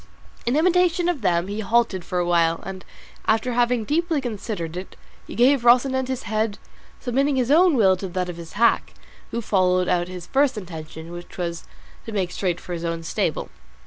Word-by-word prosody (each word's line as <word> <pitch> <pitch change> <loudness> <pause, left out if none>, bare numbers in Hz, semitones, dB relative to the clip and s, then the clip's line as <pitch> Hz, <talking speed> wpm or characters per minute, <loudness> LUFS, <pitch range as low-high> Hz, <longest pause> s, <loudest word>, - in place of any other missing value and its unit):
In 240 - +2
imitation 355 +1 +3
of 345 -7 -1
them 175 -3 +2
he 205 +2 -4
halted 220 -3 +1
for 180 - -4
a 175 - +1
while, 165 -1 +2
and 190 -1 -7 0.4
after 225 +3 +2
having 240 -1 +2
deeply 320 +4 0
considered 210 -9 -4
it, 185 +1 -7 0.3
he - - -8
gave 260 +2 +4
Rocinante 255 +2 +4
his 260 -1 -3
head, 215 -1 -1 0.4
submitting 275 +3 +1
his 255 0 +1
own 340 +1 +5
will 190 -4 +5
to 190 - -5
that 180 0 -2
of 175 -1 -6
his 170 -1 -10
hack, 235 +2 +2 0.4
who 235 - -3
followed 185 -3 +2
out 175 0 +1
his 180 -1 -8
first 270 0 +2
intention, 160 -3 -8
which 175 0 -10
was 170 -2 -4 0.4
to - - -4
make 190 -4 -1
straight 180 -3 -1
for 180 - -7
his 170 -1 -4
own 165 -1 -3
stable. - - -2
210 Hz, 190 wpm, -23 LUFS, 175-255 Hz, 0.4 s, own